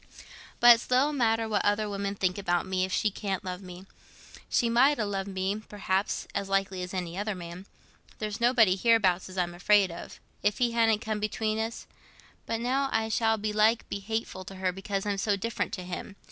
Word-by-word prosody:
But 240 0 +10
it's 230 - -4
little 265 +4 +3
matter 225 -4 +1
what 210 -2 0
other 205 +1 +1
women 200 0 -3
think 185 0 0
about 175 -3 0
me, 185 -1 0
if 190 - -7
she 210 +2 +1
can't 195 -2 -3
love 180 0 -5
me. 180 0 -10 0.6
She 240 - +2
might 260 +5 +4
ha' 225 - 0
loved 195 -1 -3
me, 190 +2 -2
perhaps, 195 -1 -1
as 195 - -3
likely 195 -1 0
as 180 0 -5
any 180 -1 -4
other 210 0 -2
man—there's 185 +4 -9
nobody 235 -6 +5
hereabouts 195 -4 +3
as 185 - -10
I'm 175 -1 0
afraid 195 +1 +3
of, 170 - -9 0.2
if 205 -1 +1
he 240 -1 +2
hadn't 225 -2 +2
come 215 -1 -2
between 215 +1 -1
us; 225 +1 -4 0.6
but 225 0 -1
now 265 +3 0
I 220 0 0
shall 225 0 +2
belike 215 +2 +2
be 200 - -3
hateful 215 -2 -4
to 195 - -9
her 185 -1 -1
because 195 +1 -4
I'm 200 -1 -1
so 205 0 +1
different 225 +3 -3
to 185 - -4
him. 180 +2 -6
205 Hz, 200 wpm, -28 LUFS, 190-225 Hz, 0.6 s, But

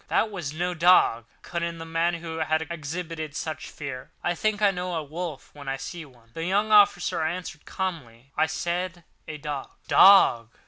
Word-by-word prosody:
that 220 - +1
was 175 -8 -4
no 175 +3 -2
dog," 170 -9 +4 0.2
cut 170 -1 -4
in 170 0 -3
the 165 - -7
man 165 +1 0
who 165 -1 -6
had 160 0 0
exhibited 160 -1 -5
such 155 0 -5
fear. 135 -4 -7
"I 175 - +1
think 210 +4 -1
I 205 -2 +4
know 180 -1 -4
a 160 - -2
wolf 160 0 -6
when 140 -2 -8
I 135 - -2
see 160 +4 -7
one." 120 -4 -21
The 165 - -5
young 205 +5 +1
officer 200 -6 +4
answered 160 -1 -4
calmly: 135 -10 -5
"I - - +2
said 175 +1 -3 0.2
a 155 -1 -6
dog." 145 -2 -5 0.2
"Dog!" 120 - +6
165 Hz, 185 wpm, -26 LUFS, 150-180 Hz, 0.2 s, Dog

